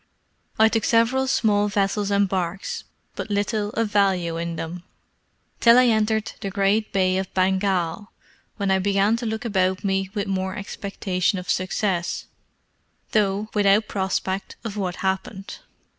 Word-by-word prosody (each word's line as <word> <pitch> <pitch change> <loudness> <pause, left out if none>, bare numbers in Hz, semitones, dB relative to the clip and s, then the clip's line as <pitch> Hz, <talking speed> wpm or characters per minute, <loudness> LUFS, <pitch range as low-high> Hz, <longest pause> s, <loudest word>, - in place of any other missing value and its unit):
I 220 - +6
took 225 -1 0
several 240 +4 +3
small 210 -5 +2
vessels 200 0 0
and 200 0 +3
barks, 185 0 -3 0.3
but - - -5
little 205 +1 0
of 225 -2 -1
value 190 -5 +2
in 170 0 -3
them, 165 +2 -5 0.8
till 235 +1 +7
I 255 - +6
entered 220 -1 +1
the 200 - -3
great 200 +2 +1
Bay 185 -1 +2
of 190 - -5
Bengal, 190 0 0 0.5
when 200 -2 0
I 190 - +3
began 200 +3 +2
to 235 -1 -4
look 220 +2 -3
about 190 -4 +1
me 195 -1 0
with 205 - -1
more 190 -1 -2
expectation 195 -2 -2
of 180 0 -3
success, 185 -1 -1 0.9
though 210 0 +1
without 205 0 +3
prospect 190 0 -2
of 220 -3 -5
what 185 -3 -2
happened. 190 +1 -3
200 Hz, 145 wpm, -23 LUFS, 190-215 Hz, 0.9 s, till